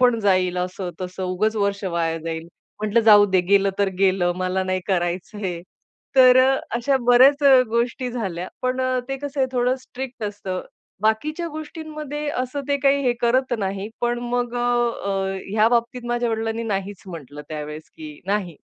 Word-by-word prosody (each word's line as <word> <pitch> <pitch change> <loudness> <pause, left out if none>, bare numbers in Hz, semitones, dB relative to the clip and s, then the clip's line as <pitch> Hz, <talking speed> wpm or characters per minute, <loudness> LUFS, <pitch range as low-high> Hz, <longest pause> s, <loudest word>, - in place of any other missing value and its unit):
पण 245 -2 +4
जाईल." 185 -3 +2
असं, 180 0 -3
तसं 185 +1 -5
"उगच 210 +5 0
वर्ष 200 -1 0
वाया 170 -3 -1
जाईल." 165 0 -5 0.3
म्हटलं, 215 +2 +2
"जाऊदे, 205 -3 +7
गेलं 200 -1 +4
तर 200 -1 +3
गेलं. 185 -2 +3
मला 185 +1 -1
नाही 185 0 -1
करायचंय." 180 0 -2 0.6
तर 255 -1 +8
अ, 270 0 +3 0.2
अशा 270 +3 +1
बऱ्याच 265 +4 +6
अ, 265 -2 +7
गोष्टी 240 +2 -1
झाल्या. 185 -7 -4
पण 255 +1 0
अ, 255 0 +1
ते 270 - -2
कसं 285 -1 -3
आहे 260 - +3
थोडं 250 +1 +1
स्ट्रिक्ट 255 -3 -7
असतं. 200 -3 -4 0.4
बाकीच्या 300 +10 0
गोष्टींमध्ये 305 -1 -6
असं 255 +1 -3
ते 285 - +2
काही 280 0 +3
हे 245 - +4
करत 255 +2 +2
नाही, 195 +1 -3
पण 240 0 0
मग 245 0 -1
अ, 240 - -1 0.4
अ, 195 -1 -1
ह्या 215 +2 +4
बाबतीत 240 +1 0
माझ्या 240 0 0
वडिलांनी 225 0 -2
नाहीच 200 -3 -3
म्हटलं 150 -5 -9
त्यावेळेस 150 0 -6
की 150 -2 -10
नाही 195 -5 -1
215 Hz, 165 wpm, -22 LUFS, 185-255 Hz, 0.6 s, तर